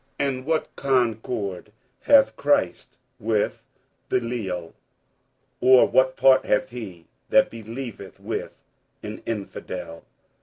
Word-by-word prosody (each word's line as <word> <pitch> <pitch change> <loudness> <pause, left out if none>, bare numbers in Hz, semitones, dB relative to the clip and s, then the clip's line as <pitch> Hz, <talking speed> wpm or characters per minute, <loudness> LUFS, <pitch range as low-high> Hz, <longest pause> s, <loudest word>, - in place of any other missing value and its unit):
47:006:015 140 - +2
And 130 - -10
what 160 -1 -1
concord 115 -7 -1 0.3
hath 280 -1 +5
Christ 285 0 0 0.2
with 110 -1 -1 0.5
Belial? 105 -9 -2 0.9
or 130 0 +7
what 130 0 +3
part 135 -1 +5
hath 105 - 0
he 95 -9 -8 0.2
that - - +4
believeth 115 -2 -8
with - - -6 0.4
an - - -7
infidel? 90 -6 -6
115 Hz, 105 wpm, -24 LUFS, 100-130 Hz, 0.9 s, or